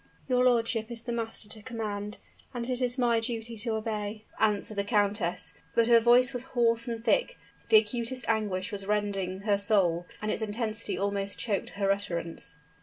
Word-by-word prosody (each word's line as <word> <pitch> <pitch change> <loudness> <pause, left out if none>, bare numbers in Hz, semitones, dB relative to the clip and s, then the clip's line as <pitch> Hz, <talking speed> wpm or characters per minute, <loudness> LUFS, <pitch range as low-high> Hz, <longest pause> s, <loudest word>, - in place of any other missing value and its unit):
"Your 250 -1 +3
lordship 230 -2 +2
is 230 -1 -2
the 240 - -4
master 225 -2 -4
to 215 - -7
command, 210 -3 -4 0.4
and 240 0 -3
it 250 0 -1
is 250 +1 +1
my 240 -2 +3
duty 230 0 -3
to 225 0 -1
obey," 215 -1 -3
answered 215 -1 +1
the 200 - +1
countess; 205 -4 0 0.2
but 230 - +5
her 235 0 +7
voice 245 +3 +5
was 245 - -3 0.2
hoarse 230 0 +4
and 230 -1 -4
thick, - - +2 0.3
the 220 - +8
acutest 235 +4 0
anguish 210 -2 0
was 200 -1 -4
rending 195 -3 -1
her 200 -1 +2
soul, 180 -5 +2
and 215 0 -1
its - - -2
intensity 220 +1 -2
almost 200 0 -1
choked 205 -4 -2
her 195 -1 +2
utterance. 170 -6 -3
220 Hz, 180 wpm, -29 LUFS, 205-235 Hz, 0.4 s, the